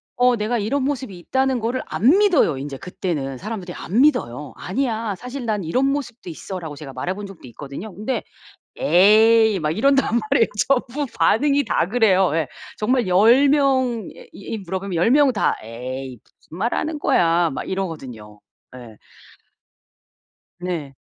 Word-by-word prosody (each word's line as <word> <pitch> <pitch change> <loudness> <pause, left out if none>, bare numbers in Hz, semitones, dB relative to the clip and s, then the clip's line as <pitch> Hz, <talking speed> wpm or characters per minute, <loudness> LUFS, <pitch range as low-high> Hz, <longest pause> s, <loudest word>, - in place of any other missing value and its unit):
어 250 -1 +3
내가 220 +3 -1
이런 255 +6 -1
모습이 260 -9 -3
있다는 265 +5 0
거를 235 +3 -2
안 270 - +3
믿어요 350 - +3
인제 140 0 -6
그때는. 145 -7 -4
사람들이 190 - -6
안 210 +8 -2
믿어요. 150 - +1
"아니야 225 -1 -2
사실 250 +1 -7
난 210 -5 -2
이런 255 +12 +1
모습도 245 -9 -5
있어"라고 160 -3 -7
제가 140 -3 -9
말해본 190 +10 -4
적도 195 -8 -13
있거든요. 140 - -9
근데 215 +8 -3 0.5
"에이." 220 0 +5
막 150 0 0
이런단 270 +3 +2
말이에요. 225 - +3 0.2
전부 275 +1 0
반응이 285 +4 +3
다 185 -4 0
그래요. 195 -6 +3
예. 160 -4 0 0.3
정말 240 0 +1
10 230 +10 +5
명에 260 -6 +1 0.2
이 220 +3 -6
물어보면 190 -1 -5
10 175 +7 +2
명 280 0 +5
다 210 - +1
"에이 125 +2 -7 0.3
무슨 165 - -10
말하는 295 +8 -2
거야." 170 - +2
막 - - -4
이러거든요. 130 - -6 0.3
예. 115 -4 -12 1.6
네. 165 -6 -4
205 Hz, 300 characters per minute, -21 LUFS, 165-250 Hz, 1.6 s, 에이